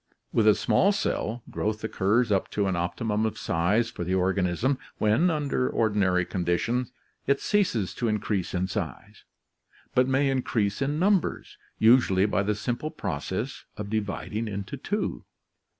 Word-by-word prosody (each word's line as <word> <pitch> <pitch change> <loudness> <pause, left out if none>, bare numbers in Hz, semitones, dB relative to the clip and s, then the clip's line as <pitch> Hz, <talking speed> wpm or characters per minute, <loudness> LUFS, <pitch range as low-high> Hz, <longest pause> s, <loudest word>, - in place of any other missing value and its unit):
With 110 -2 +3
a 105 - +7
small 200 - +3
cell, 120 - -2
growth 105 0 -2
occurs 110 +2 +1
up 95 - +1
to 100 - +2
an 95 -2 0
optimum 105 +5 -1
of 110 - -1
size 100 +8 +1
for 90 - -5
the 90 +2 0
organism, 95 +7 +1 0.2
when, 110 +12 +3
under 145 -5 0
ordinary 100 -5 +2
conditions, 115 +9 -1 0.4
it 140 0 +3
ceases 170 - +1
to 120 - -2
increase 105 -4 -1
in 90 +1 +1
size, 90 - -6 0.7
but 125 0 +4
may 135 +1 +2
increase 115 -5 0
in 145 +2 0
numbers, 190 +1 +1 0.2
usually 110 -5 +5
by 100 -1 +1
the 105 +1 0
simple 120 +7 -3
process 70 - -4
of 105 -1 -5
dividing 110 +1 -2
into 100 -2 -5
two. - - -3
110 Hz, 150 wpm, -27 LUFS, 95-125 Hz, 0.7 s, a